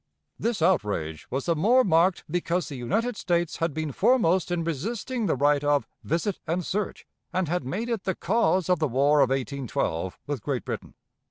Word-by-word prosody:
This 225 Hz, -7 st, 0 dB
outrage 100 Hz, -, 0 dB
was 135 Hz, +1 st, -2 dB
the 170 Hz, -, +2 dB
more 235 Hz, +11 st, +4 dB
marked 175 Hz, -1 st, +3 dB
because 175 Hz, +2 st, -1 dB
the 145 Hz, -, -6 dB
United 215 Hz, -, -1 dB
States 175 Hz, -4 st, 0 dB
had 165 Hz, 0 st, 0 dB
been 155 Hz, 0 st, -3 dB
foremost 185 Hz, -, +3 dB
in 175 Hz, -1 st, -1 dB
resisting 215 Hz, -, -2 dB
the 160 Hz, -, +2 dB
right 145 Hz, +2 st, +3 dB
of 145 Hz, -1 st, +2 dB, 0.2 s
"visit 170 Hz, +5 st, -1 dB
and 170 Hz, +2 st, -1 dB
search," 205 Hz, 0 st, -3 dB, 0.3 s
and 185 Hz, 0 st, 0 dB
had 175 Hz, 0 st, -1 dB
made 200 Hz, -, -3 dB
it 230 Hz, -5 st, -2 dB
the 190 Hz, -, 0 dB
cause 190 Hz, -3 st, +1 dB
of 180 Hz, -3 st, +2 dB
the 155 Hz, -, +2 dB
War 140 Hz, +4 st, +3 dB
of 135 Hz, -3 st, +5 dB
1812 130 Hz, -, -2 dB
with 145 Hz, -5 st, -3 dB
Great 130 Hz, 0 st, -2 dB
Britain. -, -, -6 dB
165 Hz, 185 wpm, -26 LUFS, 140-190 Hz, 0.3 s, of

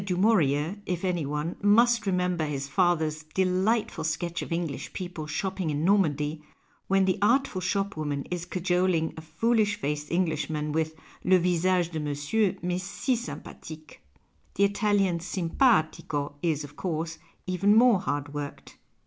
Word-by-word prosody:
du 185 Hz, -2 st, -2 dB
Muurier, 180 Hz, -3 st, +2 dB
if 180 Hz, +1 st, -2 dB
any 175 Hz, -5 st, -1 dB
one, 150 Hz, +3 st, -2 dB
must 230 Hz, +2 st, +4 dB
remember 180 Hz, -3 st, +1 dB
his 140 Hz, -2 st, -3 dB
father's 160 Hz, -2 st, +1 dB
delightful 190 Hz, 0 st, +1 dB
sketch 165 Hz, +2 st, -2 dB
of -, -, -7 dB
English 165 Hz, -5 st, -3 dB
people 175 Hz, -5 st, -5 dB
shopping 190 Hz, 0 st, -2 dB
in 150 Hz, +1 st, -1 dB
Normandy, 155 Hz, -6 st, +2 dB, 0.5 s
when 195 Hz, 0 st, +3 dB
the 190 Hz, +1 st, +1 dB
artful 235 Hz, -2 st, +2 dB
shopwoman 160 Hz, -8 st, -2 dB
is 175 Hz, -1 st, -3 dB
cajoling 180 Hz, -2 st, 0 dB
a 160 Hz, -, -8 dB
foolish 210 Hz, +7 st, +1 dB
faced 150 Hz, +1 st, -3 dB
Englishman 160 Hz, -3 st, -1 dB
with 160 Hz, +1 st, -1 dB
" -, -, -24 dB
le 185 Hz, 0 st, +5 dB
visage 180 Hz, 0 st, +1 dB
dc 160 Hz, -2 st, -3 dB
monsieur 150 Hz, +8 st, 0 dB
m'est 180 Hz, +1 st, -1 dB
si 205 Hz, +7 st, -1 dB
sympathique." 160 Hz, -, -8 dB, 0.6 s
The 200 Hz, -, +2 dB
Italian 200 Hz, -3 st, +2 dB
s'nnpaiico 165 Hz, -, +1 dB
is, 155 Hz, -3 st, 0 dB
of 145 Hz, 0 st, -11 dB
course, 165 Hz, -2 st, -3 dB, 0.3 s
even 185 Hz, +3 st, +3 dB
more 235 Hz, -3 st, +6 dB
hard 145 Hz, 0 st, -3 dB
worked. 145 Hz, -1 st, -7 dB
175 Hz, 145 wpm, -27 LUFS, 155-195 Hz, 0.6 s, more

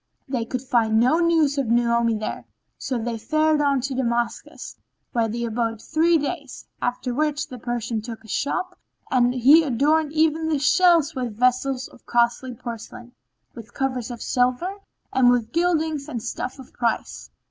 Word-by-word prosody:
They 250 Hz, -4 st, -2 dB
could 250 Hz, +2 st, -4 dB
find 230 Hz, -4 st, +2 dB
no 255 Hz, +8 st, +3 dB
news 320 Hz, -4 st, +2 dB
of 270 Hz, -, -1 dB
Naomi 235 Hz, 0 st, +2 dB
there 215 Hz, 0 st, -5 dB, 0.3 s
so 255 Hz, -, -2 dB
they 230 Hz, 0 st, -3 dB
fared 310 Hz, +3 st, +2 dB
on 280 Hz, -2 st, +2 dB
to 270 Hz, +2 st, -3 dB
Damascus, 240 Hz, -2 st, -3 dB, 0.4 s
where 230 Hz, -3 st, +1 dB
they 235 Hz, +2 st, -3 dB
abode 230 Hz, -1 st, -2 dB
three 330 Hz, +7 st, +2 dB
days, 285 Hz, -2 st, -5 dB, 0.2 s
after 245 Hz, 0 st, -2 dB
which 300 Hz, +2 st, -1 dB
the 255 Hz, -4 st, -9 dB
Persian 235 Hz, -1 st, -3 dB
took 225 Hz, 0 st, -8 dB
a -, -, -15 dB
shop 285 Hz, -, -2 dB, 0.3 s
and 245 Hz, -1 st, +3 dB
he 260 Hz, +6 st, +6 dB
adorned 295 Hz, +3 st, +1 dB
even 320 Hz, 0 st, +2 dB
the 315 Hz, -2 st, +1 dB
shelves 320 Hz, +1 st, +4 dB
with 245 Hz, -5 st, -4 dB
vessels 255 Hz, +2 st, +1 dB
of -, -, -20 dB
costly 240 Hz, +1 st, +1 dB
porcelain, 235 Hz, +1 st, -8 dB, 0.4 s
with 235 Hz, -2 st, -12 dB
covers 260 Hz, -3 st, -2 dB
of 240 Hz, -2 st, -6 dB
silver, 255 Hz, +10 st, 0 dB, 0.4 s
and 255 Hz, -1 st, +5 dB
with 240 Hz, -2 st, +1 dB
gildings 320 Hz, -3 st, 0 dB
and 235 Hz, -6 st, -5 dB
stuffs 255 Hz, +2 st, -4 dB
of 265 Hz, -2 st, -13 dB
price. 235 Hz, -1 st, -2 dB
255 Hz, 165 wpm, -23 LUFS, 235-295 Hz, 0.4 s, he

